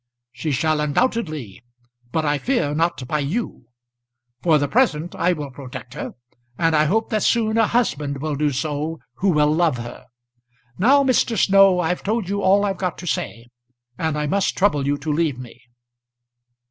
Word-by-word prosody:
"She 125 +5 -4
shall, 155 +3 +1
undoubtedly; 150 - -1 0.5
but 160 +2 0
I 145 -1 +1
fear 240 - 0
not 160 -5 -1
by 150 +3 -1
you. 150 - -3 0.8
For 165 -3 +4
the 145 -1 0
present 175 - +1
I 180 - +1
will 145 -4 -6
protect 125 -1 -9
her; - - -6 0.4
and 165 -1 +2
I 155 0 +4
hope 220 +8 0
that 215 -1 +1
soon 220 -2 +2
a 225 - +4
husband 145 - -1
will 150 +1 -2
do 150 +1 +1
so 150 +3 -3 0.2
who 195 - +1
will 150 -3 +3
love 160 -5 +2
her. 120 0 -9 0.7
Now, 275 +8 +5
Mr. 250 -3 +2
Snow, 195 -2 +5
I've 180 +1 -1
told 215 -2 -2
you 200 0 -1
all 200 +2 +4
I've 195 -1 -2
got 180 -3 -2
to 180 - -9
say, 115 -7 -3 0.5
and 160 0 -2
I 150 - -1
must 195 +6 0
trouble 150 -8 +2
you 145 0 +1
to 150 +1 -3
leave 155 -4 0
me." 125 -2 -11
160 Hz, 175 wpm, -21 LUFS, 145-195 Hz, 0.8 s, Now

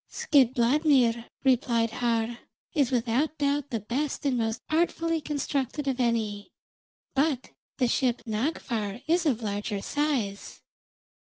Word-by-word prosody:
"Skidbladnir," 255 -2 +3 0.2
replied 235 -3 +2
Har, 235 0 -1 0.3
"is 280 -6 +2
without 255 +5 0
doubt 285 0 0
the 230 -4 -2
best 270 +8 -2
and 270 -3 +2
most 225 -1 -1
artfully 330 0 +1
constructed 285 -1 -2
of 265 -1 0
any, 220 -4 0 0.6
but 275 -2 0 0.3
the 255 - +2
ship 245 0 +1
Nagffar 225 -2 -2
is 335 +1 +2
of 240 -5 0
larger 205 0 -2
size. 245 -5 -2
250 Hz, 115 wpm, -27 LUFS, 230-290 Hz, 0.6 s, Skidbladnir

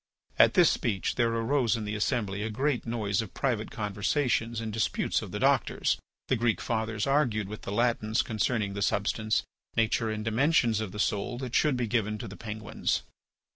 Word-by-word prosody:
At - - +6
this - - +6
speech 100 -5 -1
there 120 -2 +2
arose 115 0 +1
in 110 -2 -4
the 105 - -3
assembly 105 -2 -1
a 110 - -2
great 130 +3 -1
noise 110 -3 0
of 110 - -9
private 120 -5 -1
conversations 115 +3 0
and 110 -2 -4
disputes 110 -1 0
of - - -7
the - - -3
doctors. - - +2 0.3
The - - +2
Greek 115 -1 +1
fathers 110 -1 -1
argued 130 -8 +1
with 105 +1 -7
the - - -6
Latins 115 0 +1
concerning 110 -2 -1
the 100 - -4
substance, 110 +2 +1 0.3
nature, 115 0 +2
and 110 0 -3
dimensions 120 -1 +3
of 110 -4 -3
the 105 - -8
soul 105 +3 -1
that 125 -2 -5
should 150 -4 +3
be 125 - 0
given 110 -2 0
to 115 - -6
the 100 - -9
penguins. 110 -2 -3
110 Hz, 185 wpm, -29 LUFS, 105-120 Hz, 0.3 s, At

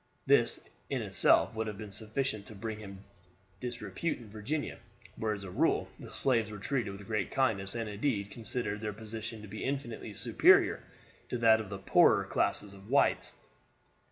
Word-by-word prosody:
This - - +3 0.2
in - - -1
itself - - +4
would 110 0 -2
have 105 -2 -5
been 105 -1 -8
sufficient 110 +1 -2
to 110 - -9
bring 110 +2 -5
him 100 -2 -10 0.6
disrepute 120 - -3
in 110 -4 -13
Virginia, 130 +9 -3 0.4
where 110 -1 -1
as 100 - -9
a 95 - -7
rule - - +2
the - - -9
slaves 115 -5 +2
were 105 - -7
treated 120 +1 -1
with 100 +1 -9
great 105 -2 -1
kindness, 105 -6 0
and 115 -1 -2
indeed 105 -1 -1
considered 110 -1 -3
their 105 -1 -3
position 110 +1 -7
to - - -8
be 105 +2 -6
infinitely 120 -6 -4
superior - - +5 0.5
to - - -1
that 110 -1 +5
of 105 - -8
the 100 - -4
poorer 95 - +5
class - - +1
of 100 0 -12
whites. 140 +2 +3
110 Hz, 175 wpm, -31 LUFS, 100-115 Hz, 0.6 s, superior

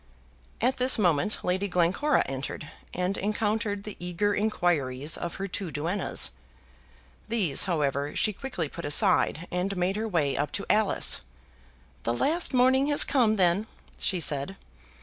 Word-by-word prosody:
At 250 +3 +1
this 255 +1 +4
moment 180 0 +1
Lady 190 +3 0
Glencora 185 - +1
entered, 135 +2 -5 0.2
and 180 +2 -2
encountered 210 0 -1
the 210 - -8
eager 180 +4 -1
inquiries 160 -10 0
of 170 - -5
her 195 - -4
two 190 -1 -5
duennas. 160 - -1 1.0
These, 205 -11 +2
however, 145 -5 -1
she 215 - +1
quickly 200 - -4
put 170 +4 -9
aside, 150 +3 +2
and 185 +2 -2
made 185 +3 0
her 220 +1 -2
way 155 -9 0
up 145 0 -2
to 200 - -3
Alice. 215 -1 +3 0.8
"The 115 - -1
last 325 - +1
morning 260 +1 +3
has 290 -1 +5
come, 240 -6 +2
then," 190 +2 +2 0.3
she 185 - +1
said. 150 +3 +1
190 Hz, 145 wpm, -27 LUFS, 165-215 Hz, 1.0 s, has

